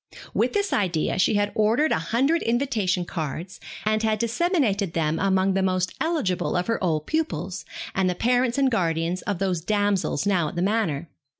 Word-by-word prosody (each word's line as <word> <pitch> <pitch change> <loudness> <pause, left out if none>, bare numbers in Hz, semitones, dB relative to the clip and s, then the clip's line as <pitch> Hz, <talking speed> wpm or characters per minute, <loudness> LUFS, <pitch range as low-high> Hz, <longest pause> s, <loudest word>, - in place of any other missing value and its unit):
With - - +1
this 405 -1 0
idea, 180 -4 0
she 200 - +3
had 205 0 +1
ordered 225 +9 +2
a - - +2
hundred 255 - +1
invitation 225 -7 0
cards, 165 +3 -5 0.3
and 215 0 +2
had 220 -1 +1
disseminated 235 - 0
them 160 -1 0
among 190 0 +2
the 195 - +1
most 185 -1 0
eligible 300 - 0
of 180 0 +1
her 230 -3 -1
old 155 -4 0
pupils, 190 - -2 0.3
and 190 -1 +1
the 180 - -1
parents 245 +3 +1
and 270 -2 +3
guardians 170 -3 0
of 205 -3 -2
those 185 -3 -1
damsels 205 0 0
now 185 -6 +2
at - - -7
the 175 - 0
Manor. 190 -7 0
195 Hz, 180 wpm, -24 LUFS, 180-230 Hz, 0.3 s, she